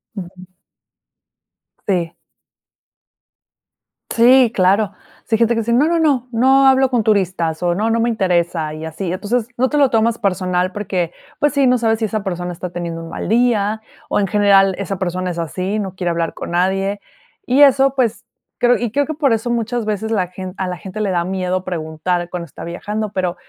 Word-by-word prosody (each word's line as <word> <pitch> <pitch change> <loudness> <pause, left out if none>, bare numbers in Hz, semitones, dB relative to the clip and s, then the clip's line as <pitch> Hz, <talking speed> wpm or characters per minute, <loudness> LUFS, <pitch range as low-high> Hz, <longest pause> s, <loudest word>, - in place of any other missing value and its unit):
Ujú. 185 -1 -9 1.4
Sí. 175 -4 -1 1.9
Sí, 245 +1 +5
claro. 195 +1 +2 0.3
Sí 225 - +1
hay - - -2
gente 235 0 +3
que - - 0
dice: 235 +1 -1
"No, 255 +5 +4
no, 335 0 +1
no, 280 -6 +1
no 265 +3 +4
hablo 265 0 +4
con 245 -3 +1
turistas, 185 -6 0
o, 175 -1 +1
no, 215 +4 0
no 230 0 +1
me 235 +1 +1
interesa" 175 -7 0
y 155 +1 -7
así. 165 +3 -4
Entonces, 210 +5 -1
no 255 +2 +2
te 300 - -1
lo 280 -2 +4
tomas 230 0 +2
personal 185 -3 0
porque, 185 -4 -2 0.3
pues 295 0 +2
sí, 280 -2 +3
no 250 0 +4
sabes 225 -2 +1
si 225 - 0
esa 215 -1 -3
persona 180 -2 -4
está 180 +1 -6
teniendo 170 -1 -5
un 165 - -9
mal - - -5
día, 220 -2 +1 0.3
o, - - +1
en 200 - +1
general, 195 0 +4
esa 195 0 -4
persona 185 0 -2
es 170 - -7
así, 185 +5 -2
no 190 -3 -5
quiere 180 -2 -1
hablar 165 -1 -2
con - - -7
nadie. 195 +3 0 0.4
Y 260 +3 +3
eso, 270 -1 +5
pues 235 -3 0 0.4
creo 245 0 +4
y 240 -2 -3
creo 285 +4 +1
que 315 - -4
por 285 -5 +1
eso 225 +2 -2
muchas 235 0 -1
veces 215 +1 -2
la 185 -5 0 0.3
a 190 - -2
la 180 -1 -4
gente 195 +5 -7
le 200 -2 0
da 175 -2 +1
miedo 185 0 -2
preguntar 175 +1 -3
cuando 175 -1 -5
está - - -11
viajando, 210 +5 -4
pero, 185 -3 -2
200 Hz, 195 wpm, -18 LUFS, 180-235 Hz, 1.9 s, Sí